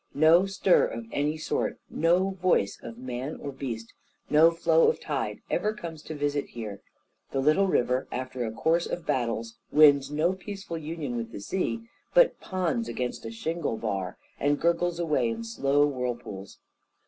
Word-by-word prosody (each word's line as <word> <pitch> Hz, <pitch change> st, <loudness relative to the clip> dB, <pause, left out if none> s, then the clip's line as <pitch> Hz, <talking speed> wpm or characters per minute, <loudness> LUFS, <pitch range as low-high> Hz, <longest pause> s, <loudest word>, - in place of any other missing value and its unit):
No 160 Hz, +6 st, +6 dB
stir 195 Hz, -1 st, +3 dB
of 115 Hz, 0 st, -6 dB
any 150 Hz, +2 st, 0 dB
sort, 155 Hz, -, -1 dB
no 180 Hz, +4 st, +2 dB
voice 185 Hz, -, +1 dB
of 115 Hz, -, -8 dB
man 130 Hz, +3 st, -5 dB
or 140 Hz, -, -5 dB
beast, 120 Hz, -4 st, -6 dB, 0.4 s
no 155 Hz, +2 st, +7 dB
flow 165 Hz, -1 st, +3 dB
of -, -, -1 dB
tide, 120 Hz, -9 st, -3 dB
ever 215 Hz, +1 st, +1 dB
comes 165 Hz, -6 st, -7 dB
to 155 Hz, -, -7 dB
visit 145 Hz, -1 st, -1 dB
here; 105 Hz, -4 st, -7 dB, 0.5 s
the 135 Hz, -, -1 dB
little 155 Hz, +8 st, +4 dB
river, 125 Hz, -6 st, +1 dB
after 130 Hz, 0 st, -3 dB
a 110 Hz, -, -2 dB
course 165 Hz, +8 st, +1 dB
of 175 Hz, -, -4 dB
battles, 115 Hz, -2 st, -2 dB
wins 145 Hz, -3 st, +6 dB
no 155 Hz, +5 st, +1 dB
peaceful 190 Hz, -3 st, -6 dB
union 150 Hz, -5 st, -4 dB
with 115 Hz, -1 st, -4 dB
the -, -, -7 dB
sea, 190 Hz, -, -2 dB, 0.3 s
but -, -, +5 dB
ponds 165 Hz, -12 st, -1 dB
against 125 Hz, -1 st, -3 dB
a -, -, -6 dB
shingle 155 Hz, +1 st, -2 dB
bar, 100 Hz, -4 st, -3 dB, 0.2 s
and 145 Hz, 0 st, +2 dB
gurgles 170 Hz, +1 st, +1 dB
away 170 Hz, +6 st, +1 dB
in 230 Hz, 0 st, -4 dB
slow 145 Hz, -11 st, +2 dB
whirlpools. 120 Hz, -8 st, -4 dB
145 Hz, 165 wpm, -27 LUFS, 120-170 Hz, 0.5 s, no